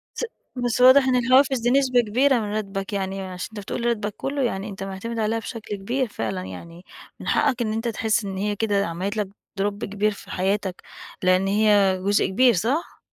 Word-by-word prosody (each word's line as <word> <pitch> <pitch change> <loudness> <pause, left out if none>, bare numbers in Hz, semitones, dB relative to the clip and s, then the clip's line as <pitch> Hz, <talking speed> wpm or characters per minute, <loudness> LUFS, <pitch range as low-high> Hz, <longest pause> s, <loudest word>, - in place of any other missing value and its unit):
س - - -2 0.3
بس 245 -1 -1
واضح 260 +2 +8
إن 255 - +3
الحوافز 260 +2 +4
دي 240 +1 +1
نسبة 255 -2 +4
كبيرة 250 +4 +2
من 210 -1 -4
راتبك، 195 -1 -4
يعني 195 -1 -2
عشان 185 -1 -6
أنت 210 - -6
بتقول 235 +4 -4
راتبك 210 -3 -1
كلّه 275 0 -2
يعني 205 -4 -2
أنت 195 -2 -8
معتمد 195 +4 -5
عليها 220 +1 0
بشكل 220 -2 -6
كبير 245 +7 -1
فعلًا 105 - -4
يعني 165 - -10 0.4
من - - -6
حقك 260 -4 +2
إن 215 -2 -1
أنت 225 +2 -2
تحس 220 -1 0
إن 195 -1 -5
هي 205 +1 -1
كده 205 -2 +1
عملت 185 +6 -3
لك 205 -2 -1 0.3
drop 205 0 -1
كبير 205 +2 0
في 200 - -11
حياتك، 190 0 -1 0.4
لإن 185 +1 +3
هي 200 -2 +3
جزء 205 +1 +3
كبير 240 +6 +4
صح؟ 240 - -1
210 Hz, 195 wpm, -23 LUFS, 195-240 Hz, 0.4 s, واضح